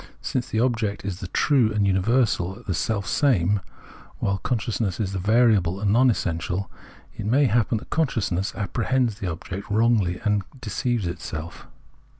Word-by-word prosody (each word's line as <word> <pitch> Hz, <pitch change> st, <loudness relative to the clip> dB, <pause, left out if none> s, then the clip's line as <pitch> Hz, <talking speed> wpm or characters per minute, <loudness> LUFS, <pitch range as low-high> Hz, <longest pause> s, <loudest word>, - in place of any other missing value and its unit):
Since 125 Hz, -1 st, -2 dB
the 110 Hz, -, 0 dB
object 115 Hz, -5 st, 0 dB
is 95 Hz, -2 st, -4 dB
the 95 Hz, -, -5 dB
true 120 Hz, +2 st, +2 dB
and 105 Hz, -2 st, +1 dB
universal, 100 Hz, 0 st, +1 dB
the 95 Hz, -, -1 dB
self 100 Hz, +3 st, -1 dB
same, 105 Hz, -, +2 dB, 0.6 s
while 100 Hz, -1 st, -1 dB
con 125 Hz, -, 0 dB
sciousness 110 Hz, -4 st, -2 dB
is 100 Hz, -4 st, -1 dB
the 95 Hz, -, -2 dB
variable 100 Hz, -3 st, +3 dB
and 100 Hz, -1 st, +1 dB
non 130 Hz, +3 st, +5 dB
essential, 90 Hz, -2 st, -2 dB, 0.4 s
it 100 Hz, -, -5 dB
may 135 Hz, +6 st, +4 dB
happen 120 Hz, -1 st, +2 dB
that -, -, -10 dB
consciousness 110 Hz, -, 0 dB
apprehends 115 Hz, +1 st, 0 dB
the 95 Hz, -, -3 dB
object 90 Hz, +5 st, -6 dB
wrongly 105 Hz, -4 st, +2 dB
and 105 Hz, -1 st, +2 dB, 0.2 s
deceives 120 Hz, -1 st, -1 dB
itself. 85 Hz, -1 st, -6 dB
105 Hz, 155 wpm, -24 LUFS, 95-120 Hz, 0.6 s, non